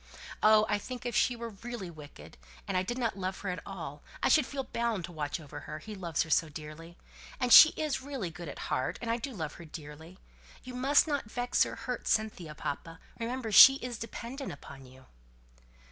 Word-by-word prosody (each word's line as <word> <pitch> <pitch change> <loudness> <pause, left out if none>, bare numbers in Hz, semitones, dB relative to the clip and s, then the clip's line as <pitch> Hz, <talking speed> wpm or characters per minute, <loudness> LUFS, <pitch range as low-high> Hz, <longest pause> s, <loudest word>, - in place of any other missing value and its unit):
Oh! 215 0 +6
I 205 0 0
think 250 +3 -8
if 240 -2 -2
she 245 - +3
were 235 -1 -6
really 210 -3 -7
wicked, 145 - -13 0.3
and - - -2
I 185 - +3
did 240 +7 -3
not 230 -6 -2
love 185 0 -4
her 200 - -3
at 180 - -4
all, 155 -7 -7 0.2
I - - +4
should 305 -5 +4
feel 275 -1 -4
bound 235 -7 -2
to 175 - -11
watch 150 -1 -3
over 145 -1 -9
her, 155 +1 -7
he 210 +8 -9
loves 170 -6 -1
her 160 - -9
so 160 - +3
dearly. 155 +3 -10 0.4
And 250 -2 +3
she 315 - +12
is 305 -4 -1
really 260 -10 -5
good 170 -1 -8
at - - -8
heart, 130 - -1
and 230 - -2
I 230 - +1
do 255 +4 -5
love 160 -10 -5
her - - -10
dearly. 160 +2 -10 0.5
You 255 - -9
must 270 +4 +4
not 285 -8 -2
vex 245 +2 +1
or - - -6
hurt 250 -1 -5
Cynthia, 200 -8 -1
papa, 165 +3 -5 0.2
remember 235 0 -3
she 270 +7 +10
is 245 -3 -6
dependent 240 +4 -6
upon 135 -2 -11
you!" 130 +1 -17
200 Hz, 210 wpm, -30 LUFS, 160-245 Hz, 0.5 s, she